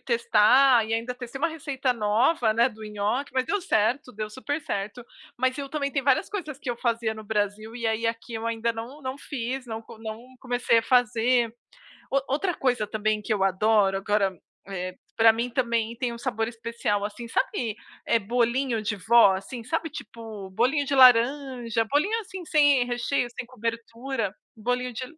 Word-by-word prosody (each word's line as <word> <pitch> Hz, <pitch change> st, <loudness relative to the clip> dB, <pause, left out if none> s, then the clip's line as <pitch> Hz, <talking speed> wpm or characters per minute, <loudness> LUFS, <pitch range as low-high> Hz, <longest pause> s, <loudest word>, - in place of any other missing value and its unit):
testar 235 Hz, +1 st, +4 dB
e 225 Hz, -, -4 dB
ainda 235 Hz, +2 st, -2 dB
testei 250 Hz, +1 st, -8 dB
uma 330 Hz, +4 st, +1 dB
receita 280 Hz, -5 st, -2 dB
nova, 225 Hz, +3 st, +2 dB
né, 235 Hz, +3 st, +4 dB
do 220 Hz, -3 st, -13 dB
nhoque, 210 Hz, +6 st, -2 dB
mas 260 Hz, -1 st, +1 dB
deu 410 Hz, -, 0 dB
certo, 250 Hz, -, 0 dB
deu 215 Hz, 0 st, -4 dB
super 285 Hz, +7 st, -4 dB
certo. 210 Hz, +1 st, -4 dB, 0.3 s
Mas 255 Hz, +1 st, +1 dB
eu 280 Hz, -1 st, -5 dB
também, 280 Hz, -1 st, -2 dB
tem 275 Hz, -1 st, -1 dB
várias 270 Hz, +7 st, +2 dB
coisas 310 Hz, -9 st, -5 dB
que 255 Hz, -, -4 dB
eu 240 Hz, -, -3 dB
fazia 230 Hz, -2 st, -1 dB
no 215 Hz, 0 st, -9 dB
Brasil 210 Hz, +1 st, -2 dB
e 235 Hz, -2 st, -3 dB
aí 225 Hz, +1 st, 0 dB
aqui 230 Hz, +1 st, -4 dB
eu 225 Hz, +1 st, -3 dB
ainda 230 Hz, 0 st, 0 dB
não 235 Hz, +6 st, -8 dB
não 260 Hz, -1 st, -4 dB
fiz, 260 Hz, -2 st, -4 dB
não 225 Hz, -1 st, -5 dB
co 225 Hz, 0 st, -14 dB
não 220 Hz, 0 st, -6 dB, 0.2 s
comecei 245 Hz, -2 st, +2 dB
a -, -, +1 dB
fazer. 245 Hz, -1 st, +2 dB, 0.6 s
O 275 Hz, -, +2 dB
outra 350 Hz, +6 st, 0 dB
coisa 245 Hz, -7 st, 0 dB
também 215 Hz, 0 st, -1 dB
que 220 Hz, -, -2 dB
eu 195 Hz, -, +1 dB
adoro, 195 Hz, 0 st, +3 dB
agora, 195 Hz, -2 st, 0 dB, 0.3 s
eh, 185 Hz, -1 st, -5 dB, 0.2 s
pra 225 Hz, 0 st, +7 dB
mim 235 Hz, +2 st, -2 dB
também 235 Hz, -2 st, 0 dB
tem 245 Hz, -1 st, -2 dB
um 235 Hz, -, -8 dB
sabor 225 Hz, -2 st, -2 dB
especial, 230 Hz, -3 st, -2 dB
assim. 225 Hz, +3 st, -6 dB
Sabe, 225 Hz, -1 st, -1 dB, 0.3 s
eh, 230 Hz, -, +3 dB
bolinho 235 Hz, +2 st, 0 dB
de 210 Hz, -1 st, -2 dB
vó, 220 Hz, -1 st, +5 dB
assim, 230 Hz, +5 st, -7 dB
sabe, 325 Hz, +6 st, -2 dB
tipo 220 Hz, -8 st, -9 dB
bolinho 255 Hz, +9 st, +1 dB
de 280 Hz, -, 0 dB
laranja, 250 Hz, -2 st, +4 dB
bolinho 305 Hz, -, +1 dB
assim, 380 Hz, -3 st, -8 dB
sem 290 Hz, -5 st, +4 dB
recheio, 245 Hz, +1 st, -1 dB
sem 240 Hz, 0 st, -7 dB
cobertura, 230 Hz, -1 st, -4 dB, 0.2 s
bolinho 245 Hz, +3 st, -2 dB
de 250 Hz, +3 st, -5 dB
235 Hz, 185 wpm, -26 LUFS, 220-260 Hz, 0.6 s, pra